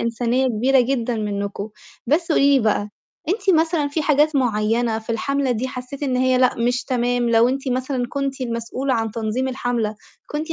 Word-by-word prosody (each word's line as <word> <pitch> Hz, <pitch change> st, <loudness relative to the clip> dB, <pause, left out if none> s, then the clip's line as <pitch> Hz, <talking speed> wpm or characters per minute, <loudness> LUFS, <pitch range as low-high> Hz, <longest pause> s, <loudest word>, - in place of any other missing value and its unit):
إنسانية 240 Hz, +3 st, 0 dB
كبيرة 255 Hz, +3 st, +3 dB
جدًا 245 Hz, -2 st, 0 dB
منّكم. 200 Hz, -1 st, -3 dB, 0.4 s
بس 330 Hz, +3 st, +1 dB
قولي 280 Hz, -1 st, +4 dB
لي -, -, +3 dB
بقى، 210 Hz, -1 st, +1 dB, 0.4 s
أنتِ 395 Hz, +1 st, +1 dB
مثلًا 320 Hz, -3 st, 0 dB
في 310 Hz, +2 st, -2 dB
حاجات 295 Hz, 0 st, +3 dB
معينّة 225 Hz, -1 st, +1 dB
في 225 Hz, +1 st, -8 dB
الحَملة 275 Hz, +3 st, -1 dB
دي 245 Hz, +2 st, -1 dB
حسّيتِ 260 Hz, +2 st, -8 dB
إن 260 Hz, -3 st, 0 dB
هي 255 Hz, 0 st, +2 dB
لأ 255 Hz, -1 st, +3 dB
مش 245 Hz, +2 st, 0 dB
تمام، 245 Hz, -1 st, 0 dB
لو 230 Hz, +1 st, +5 dB
أنتِ 270 Hz, +1 st, -2 dB
مثلًا 255 Hz, 0 st, -1 dB
كنتِ 275 Hz, -1 st, -3 dB
المسؤولة 245 Hz, +2 st, -2 dB
عن 225 Hz, -1 st, -1 dB
تنظيم 230 Hz, +4 st, -2 dB
الحملة، 245 Hz, -4 st, -2 dB, 0.3 s
كنتِ 310 Hz, +2 st, -4 dB
250 Hz, 175 wpm, -21 LUFS, 230-275 Hz, 0.4 s, لو